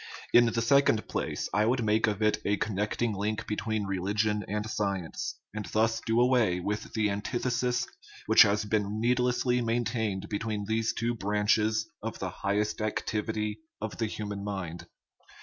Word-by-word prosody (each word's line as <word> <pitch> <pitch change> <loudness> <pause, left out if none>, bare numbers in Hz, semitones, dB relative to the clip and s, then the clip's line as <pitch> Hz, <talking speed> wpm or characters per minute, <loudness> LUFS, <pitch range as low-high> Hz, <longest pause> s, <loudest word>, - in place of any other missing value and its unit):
In 120 - +8
the 115 0 0
second 140 -3 +3
place, - - -2
I 105 +2 +3
would 125 0 +1
make 110 +1 +3
of 105 0 -1
it 105 0 +3
a 100 0 +1
connecting 105 +3 -1
link 105 +2 -2
between 110 0 -2
re 95 -1 -2
ligion 105 +2 0
and 105 +1 -2
science, 100 -6 -2 0.2
and 105 -1 -4
thus 110 +2 +1
do 115 +1 +1
away 120 -7 +3
with 105 +4 -3
the 110 -2 +1
antith 105 +4 -3
esis 125 0 +1 0.4
which - - +7
has 105 +2 +5
been 105 0 0
needlessly 125 +1 +2
maintained 115 -4 -1
between 105 0 -3
these 110 +1 0
two 115 +1 -1
branches 110 +1 +1
of 115 +1 -4
the 95 -1 -4
highest 105 +4 -1
activity 105 0 -2 0.2
of 110 +1 -5
the 110 - +1
hu 105 0 -5
man 100 -1 -5
mind. 95 -4 -5
105 Hz, 165 wpm, -29 LUFS, 105-115 Hz, 0.4 s, In